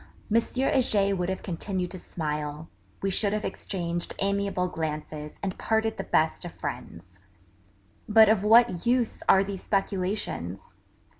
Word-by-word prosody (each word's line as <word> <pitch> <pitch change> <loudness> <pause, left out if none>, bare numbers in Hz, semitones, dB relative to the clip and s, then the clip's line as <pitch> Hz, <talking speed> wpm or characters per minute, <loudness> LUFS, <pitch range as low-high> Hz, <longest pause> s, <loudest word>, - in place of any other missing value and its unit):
Heger 230 -4 +2
would 180 -1 -1
have 190 - -3
continued 180 0 -3
to 185 - -6
smile; 150 -1 -4 0.3
we 195 - +1
should 200 +2 +1
have 215 0 -1
exchanged 175 -3 -3
amiable 200 -2 0
glances 155 -2 -5
and 190 -2 -2
parted 220 0 0
the - - -3
best - - +1
of - - -6
friends.... - - -7 0.9
But 220 +1 +8
of 210 -2 +3
what 225 -3 +5
use 245 -1 +1
are 195 - +7
these 195 -1 -5
speculations? 190 - -2
195 Hz, 135 wpm, -27 LUFS, 170-215 Hz, 0.9 s, But